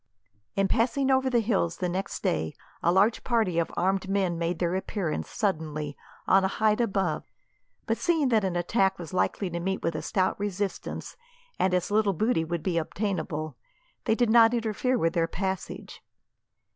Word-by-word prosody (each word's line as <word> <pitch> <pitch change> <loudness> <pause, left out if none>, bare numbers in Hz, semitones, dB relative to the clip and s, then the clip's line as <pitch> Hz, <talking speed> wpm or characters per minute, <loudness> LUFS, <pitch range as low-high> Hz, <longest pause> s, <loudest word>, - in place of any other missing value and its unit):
In 195 0 +2
passing 255 +5 +1
over 260 0 +3
the 240 -2 +3
hills 195 -6 0
the 180 - -1
next 185 +3 -3
day, 80 0 0 0.3
a 170 - +3
large 200 +5 +3
party 220 -8 +1
of 165 - -1
armed 190 +2 +1
men 195 -3 +1
made 170 0 -1
their 175 0 0
appearance, 190 -3 -2
suddenly, 155 -7 -2 0.3
on 195 0 +5
a - - +3
height 215 +3 +2
above; 195 -8 -1 0.6
but, - - -1
seeing 320 -6 +2
that 220 -4 +3
an 185 -2 -1
attack 190 +2 +1
was 175 0 -8
likely 190 +1 0
to 170 - -3
meet 190 +2 -2
with 165 - 0
a 155 - -3
stout 185 +5 0
resistance, 200 -1 -4 0.4
and 190 - +3
as 180 +2 -1
little 210 -1 +3
booty 215 -1 +1
would 165 0 -3
be 175 -3 +1
obtainable, 160 - -3 0.5
they 220 - +3
did 240 -2 +2
not 230 0 +6
interfere 235 +3 0
with 165 -6 +1
their 165 -1 +1
passage. 190 +1 -4
190 Hz, 175 wpm, -27 LUFS, 170-220 Hz, 0.6 s, not